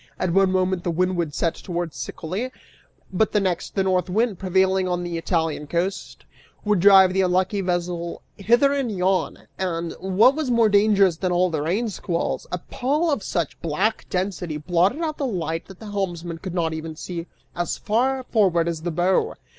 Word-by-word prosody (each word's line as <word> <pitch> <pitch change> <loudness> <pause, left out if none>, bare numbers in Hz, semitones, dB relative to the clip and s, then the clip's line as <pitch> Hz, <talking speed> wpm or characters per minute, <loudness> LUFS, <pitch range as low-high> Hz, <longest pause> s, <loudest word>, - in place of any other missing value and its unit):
At 185 -2 -1
one 195 0 +4
moment 185 -1 0
the - - -1
wind 180 +2 +1
would 165 -3 -1
set 165 - 0
towards 175 -3 -5
Sicily, 200 +11 -4 0.6
but 215 +3 +1
the 210 - +4
next, 185 -4 -2
the 195 - +2
North 185 -1 +1
Wind, 215 0 0
prevailing 190 0 +2
on 175 -1 -1
the 175 -1 -4
Italian 165 -3 -1
coast, 180 +5 -3 0.4
would 210 -2 +2
drive 190 0 +7
the 190 - +2
unlucky 185 +2 +1
vessel 175 -2 -3
hither 240 +7 +3
and 270 -5 -1
yon; 185 -1 -1
and, 170 -3 -2
what 190 +7 +4
was 310 -4 -2
more 230 -2 +4
dangerous 200 -4 +4
than 185 +1 -1
all 180 0 +2
the 155 -2 -1
rain 190 +10 0
squalls, 175 -3 -3
a 180 - -1
pall 300 +6 +1
of 280 - 0
such 170 -5 -3
black 165 +7 -1
density 180 -4 -2
blotted 180 - +1
out 310 -2 -3
the 280 - 0
light 165 -6 -3
that 195 - -12
the 215 -2 -8
helmsman 175 -4 -3
could 185 0 -6
not 165 -2 0
even 160 0 -6
see 170 +1 -6 0.3
as 175 -1 -2
far 255 +5 0
forward 185 -9 +2
as 165 -2 -3
the 175 - -2
bow. 175 +3 +1
185 Hz, 185 wpm, -23 LUFS, 170-205 Hz, 0.6 s, drive